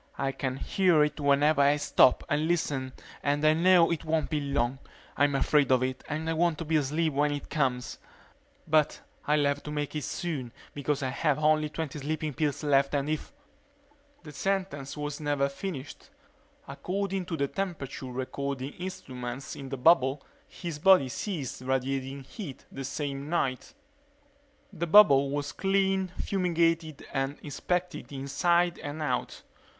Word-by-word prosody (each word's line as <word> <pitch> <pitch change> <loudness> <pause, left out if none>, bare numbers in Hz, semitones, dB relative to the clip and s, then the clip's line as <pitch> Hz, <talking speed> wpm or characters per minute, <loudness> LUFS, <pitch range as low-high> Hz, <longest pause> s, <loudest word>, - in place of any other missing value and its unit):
I 135 -1 0
can 130 -1 -3
hear 175 -1 +3
it 150 +1 -2
whenever 145 +1 +3
I 140 +1 +5
stop 145 -3 +4
and 150 +2 0
listen 140 -6 -1 0.3
and 145 +1 0
I 155 - +6
know 170 +1 +5
it 165 -2 -2
won't 160 -1 -1
be 155 - +1
long. 135 -2 -1 0.4
I'm 145 -1 +2
afraid 140 -1 +3
of 130 -1 +4
it 130 0 -3
and 155 +1 -3
I 165 - +1
want 165 -1 +1
to 165 - -5
be 160 +1 0
asleep 155 +2 0
when 145 +1 +2
it 145 -1 -5
comes. 130 -5 -1 0.7
But 155 -1 +2 0.3
I'll 150 -1 +3
have 140 0 0
to - - -8
make 150 0 -3
it 150 - -2
soon 140 -10 -4 0.2
because 145 0 -1
I 130 - 0
have 140 +2 +1
only 155 0 +2
twenty 150 -1 -5
sleeping 155 +1 -3
pills 150 0 -1
left 140 -1 +3
and 140 +1 0
if 155 - -3
_ - - -34 0.9
The 150 - -9
sentence 150 -4 -2
was 150 0 -4
never 145 -2 +1
finished. 140 0 -7 0.6
According 190 +5 -3
to 165 - -3
the 140 - +1
temperature 155 -8 -4
recording 130 +2 -4
instruments 130 -8 -6
in 135 -1 -8
the 135 - -4
bubble 135 -1 +4 0.2
his 170 -4 -6
body 185 -6 +6
ceased 140 - -4
radiating 135 +1 -2
heat 150 - -9
that 135 - -6
same 140 +1 -4
night. 155 - -1 1.0
The 170 -1 -3
bubble 140 -8 +7
was 145 +1 -2
cleaned, 195 +1 +1
fumigated, 165 -5 0
and 135 +1 -1
inspected 180 +5 -3
inside 170 +6 +1
and 145 +2 -5
out. 125 -4 -2
145 Hz, 160 wpm, -28 LUFS, 135-165 Hz, 1.0 s, bubble